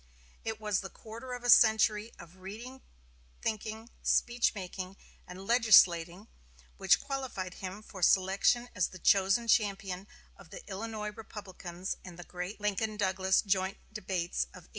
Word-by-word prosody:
It 220 -1 -4
was 210 -3 0
the 190 - -6
quarter 230 +5 -9
of 245 -1 -6
a 245 - -1
century 220 0 +5
of 175 +2 -14
reading 225 +8 -9 0.6
thinking, 220 +1 -4
speech 240 -2 +2
making 185 0 -6 0.3
and 185 +2 -9
legislating 195 -5 +5 0.5
which - - +4
qualified 260 -10 -4
him 190 +3 -7
for 195 -3 -11
selection 195 +7 +3
as 185 - +1
the 185 - -11
chosen 195 +5 +3
champion 195 -4 +1 0.3
of - - -16
the - - -11
Illinois 210 +1 -4
Republicans 190 -4 -7
in 180 -2 -10
the 175 - -9
great 180 +4 -6
Lincoln 210 +1 -1
Douglas 190 -1 +2
joint 190 -1 0 0.2
debates 185 -4 -2
of - - -15
1858. - - -24
200 Hz, 145 wpm, -31 LUFS, 185-220 Hz, 0.6 s, century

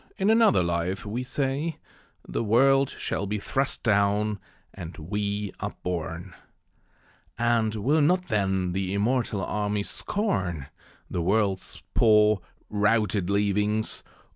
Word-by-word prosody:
in 195 +3 +3
another 220 - +5
life, 85 +2 -2
we 110 +4 -3
say 135 +5 -1 0.5
The - - -2
world 135 +5 +4
shall 100 - -3
be 105 +2 -1
thrust 135 +7 -1
down, 105 0 +2 0.3
and 85 -3 -8
we 100 +4 -3
up - - -5
borne. 85 +1 -4 1.0
And 115 -2 +1
will 140 +9 +2
not, 180 +5 +3
then, 95 - 0
the 95 +1 -2
immortal 105 -2 0
armies 105 -1 -2
scorn 90 - -2 0.4
The 90 - -3
world's 95 +1 0
poor, 105 -3 +4 0.3
routed 105 -2 +1
leavings? 105 +2 0
105 Hz, 115 wpm, -26 LUFS, 95-120 Hz, 1.0 s, another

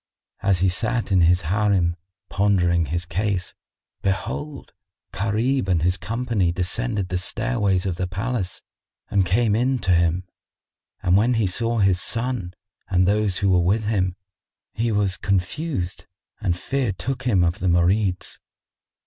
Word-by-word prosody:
As 95 -3 +2
he 95 - +4
sat 115 +4 -1
in 95 -2 +4
his 85 +1 +4
Harim, 95 -1 +1 0.3
pondering 90 -5 +2
his 85 +4 -2
case, 95 +2 -2 0.5
behold, 115 +10 -3 0.4
Gharib 110 +5 0
and 85 -4 +1
his 90 +1 +2
company 110 -1 -1
descended 95 +3 -1
the 90 0 -1
stairways 100 -1 0
of 90 -3 -2
the 90 - -1
palace 100 +1 -3 0.5
and 95 -3 +2
came 105 +3 +2
in 130 +3 +1
to 95 -6 0
him; 85 +1 +2 0.8
and 90 +2 +4
when 120 +4 +3
he 110 -2 +2
saw 115 +5 0
his 95 -4 +3
son 115 -7 -2 0.3
and 90 -1 +3
those 100 -2 +1
who 100 -1 +2
were 90 -1 +4
with 100 +5 +1
him, 95 -4 0 0.6
he 115 +1 0
was 100 -3 +1
confused 100 - -2 0.3
and 90 -5 -1
fear 135 +2 -1
took 125 +8 -4
him 95 -7 +3
of 85 +4 0
the 95 - -1
Marids. 90 +2 +1
95 Hz, 150 wpm, -23 LUFS, 90-110 Hz, 0.8 s, he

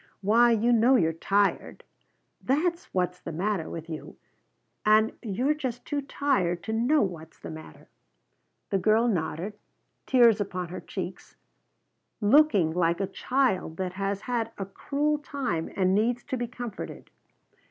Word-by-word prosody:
Why 230 +5 +5
you 235 +1 +3
know 235 +3 +5
you're 165 -8 +3
tired! 200 +5 0 0.6
That's 335 +6 0
what's 180 -1 -1
the - - -7
matter 185 +1 -1
with 165 -1 -7
you, 160 -2 -8 0.7
and 215 +1 +4
you're 245 +7 0
just 255 -5 -5
too 290 -1 -2
tired 255 -11 0
to 220 - -3
know 245 +6 +3
what's 165 -4 -6
the - - -8
matter." 155 0 -11 0.8
The 195 - +2
girl 220 +4 +3
nodded, 190 +1 -2 0.5
tears 235 -5 +5
upon 185 -3 -4
her 180 - -6
cheeks, - - -7 0.8
looking 210 - +4
like 170 0 +1
a 195 - +1
child 195 -5 0
that 185 -1 -3
has 195 +1 -2
had 230 -2 -2
a 195 - -3
cruel 290 +9 -1
time 260 - -3
and 185 -1 +2
needs 235 +4 +1
to - - -3
be 240 -1 -2
comforted. 240 -3 -7
210 Hz, 145 wpm, -27 LUFS, 180-245 Hz, 0.8 s, Why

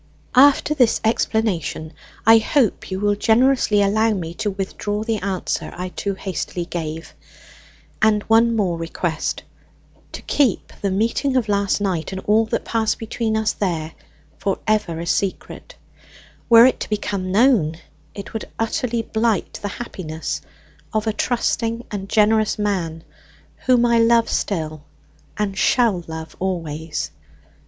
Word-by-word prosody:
"After 285 +3 +5
this 250 -6 +3
explanation 200 -8 0 0.3
I 225 +1 +8
hope 230 -1 +1
you 190 0 -3
will 205 0 +2
generously 220 0 +3
allow 220 +3 +2
me 170 -3 -4
to 205 - -2
withdraw 205 +2 -3
the 225 -1 -1
answer 195 -2 -3
I 180 +1 -4
too 200 +2 -3
hastily 185 -2 -4
gave. 165 -2 -5 0.9
"And 215 -1 +3
one 230 +1 +4
more 180 -6 0
request. 165 -1 -3 0.7
To - - -7
keep 260 -10 +1
the 200 - 0
meeting 230 +7 0
of 240 -4 0
last 200 -1 +1
night, 185 -5 -1
and 190 - -4
all 215 +3 +3
that - - -2
passed 225 -2 0
between 225 -1 -2
us 220 0 +1
there, 165 -5 -2 0.5
for 195 - -1
ever 210 -7 0
a 170 - -4
secret. 190 +2 -3 0.7
Were 230 0 +9
it 260 - +2
to - - -5
become 200 -3 -2
known, 200 - +3 0.4
it 200 0 -8
would 220 - -5
utterly 225 +1 -1
blight 220 -2 -1
the 205 - -3
happiness 185 -7 -5 0.5
of 215 0 +1
a 220 - 0
trusting 235 0 -1
and 200 -2 -5
generous 215 0 +3
man, 175 -6 -2 0.6
whom 245 -2 +5
I 235 -1 +3
love 230 0 +4
still, 155 -6 -2 0.6
and 205 -2 -1
shall 215 -4 +2
love 160 -1 -7
always. 165 -4 -3
205 Hz, 140 wpm, -21 LUFS, 180-225 Hz, 0.9 s, Were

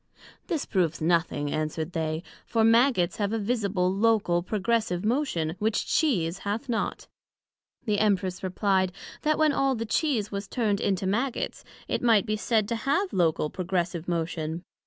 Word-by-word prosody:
This 325 -7 -1
proves 175 -5 0
nothing, 160 -3 +1
answered 155 +2 -2
they; 160 0 -2 0.2
for 225 -1 +2
Maggots 230 -5 +4
have 205 -1 0
a - - +1
visible, 200 -5 0
local, 205 -4 +2
progressive 210 -1 -1
motion, 215 - 0
which 220 +1 0
Cheese 190 - +1
hath 210 +6 -3
not. 235 -3 -2 0.8
The 210 -2 +1
Empress 195 -3 +1
replied, 185 -1 +1 0.3
That 305 0 +2
when 310 -1 +4
all 270 -1 +2
the 230 0 -3
Cheese 230 -4 0
was 200 0 -4
turned 210 -5 0
into 195 -1 0
Maggots, 235 +7 -1 0.2
it - - -1
might 230 -4 +4
be 215 -1 0
said 215 -1 +1
to 235 - 0
have 350 - 0
local, 165 -4 +1
progressive 175 -2 -2
motion. 165 -1 -2
200 Hz, 155 wpm, -27 LUFS, 175-230 Hz, 0.8 s, Maggots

